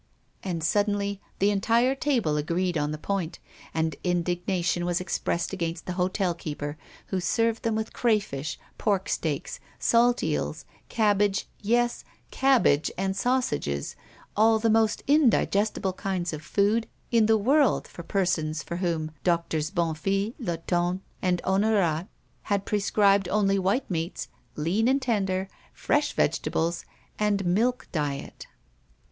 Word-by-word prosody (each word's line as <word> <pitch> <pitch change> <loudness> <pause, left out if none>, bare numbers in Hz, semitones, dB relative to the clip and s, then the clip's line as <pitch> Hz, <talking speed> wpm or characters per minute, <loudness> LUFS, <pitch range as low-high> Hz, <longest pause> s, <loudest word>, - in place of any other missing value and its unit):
And 170 -4 -3
suddenly 200 +3 0 0.2
the 200 +2 +3
entire 230 +6 +2
table 250 - 0
agreed 170 +4 0
on 150 -1 0
the 155 - -3
point, 180 0 -3 0.3
and 160 0 -1
indignation 175 0 0
was 175 0 0
expressed 180 -1 -2
against 170 -3 -3
the 180 - -3
hotel 180 0 0
keeper, 145 -3 -5 0.3
who 190 - 0
served 230 +4 +1
them 225 -1 0
with 220 0 -3
crayfish, 200 - 0 0.2
porksteaks, 190 -7 -1 0.2
salt 240 +1 +3
eels, - - -2 0.2
cabbage, 205 -2 +2
yes, 240 +3 +1 0.3
cabbage 245 - +3
and 190 +1 -1
sausages, 195 - -1 0.4
all 220 +1 +5
the 225 0 +2
most 220 -1 +2
indigestible 220 -9 +2
kinds 185 -3 -2
of 155 - -5
food 205 +7 +1 0.2
in 230 -3 +4
the 220 0 +5
world 270 +4 +3
for - - -9
persons 165 -4 -1
for 170 - -5
whom 165 -4 -1
Doctors 170 -3 0
Bonnefille, 195 +5 -1
Latonne, 175 -2 -1 0.2
and 180 -1 +1
Honorat 190 -4 +2 0.4
had 200 -1 +1
prescribed 200 -2 +2
only 195 -1 +2
white 195 +8 0
meats, 165 +1 -3 0.3
lean 180 +10 +1
and 270 +2 +3
tender, 195 -7 0 0.3
fresh - - 0
vegetables, 170 +1 0 0.3
and 205 -2 +1
milk 230 +8 +1
diet. 145 -4 -4
195 Hz, 130 wpm, -26 LUFS, 170-215 Hz, 0.4 s, all